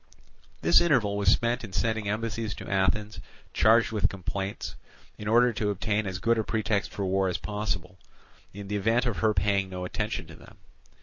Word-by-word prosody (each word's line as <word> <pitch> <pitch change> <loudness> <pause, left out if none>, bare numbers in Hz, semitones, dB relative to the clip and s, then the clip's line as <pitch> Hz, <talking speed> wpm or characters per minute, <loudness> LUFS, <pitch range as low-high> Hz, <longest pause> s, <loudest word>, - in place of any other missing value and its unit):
This 85 +1 +6
interval 125 -12 +2
was 100 -1 -2
spent 120 +3 +2
in 105 -4 -8
sending 105 +2 -1
embassies 110 0 -2
to - - -9
Athens 100 +2 0 0.3
charged 115 +1 +4
with 105 -2 +1
complaints, 95 +1 -5 0.4
in 105 - -6
order 120 +2 +4
to 105 -1 -1
obtain 105 +1 -1
as 95 -1 -3
good 115 +2 +1
a - - +1
pretext 110 -1 -1
for 100 - -3
war 95 0 +1
as 90 - -1
possible, 100 -4 -4 0.5
in 100 0 -9
the 105 +1 -1
event 115 +4 +2
of 120 -4 -1
her 110 -1 +2
paying 100 -2 +1
no 90 -1 -5
attention - - -3
to - - -12
them. - - -16
105 Hz, 185 wpm, -27 LUFS, 95-110 Hz, 0.5 s, This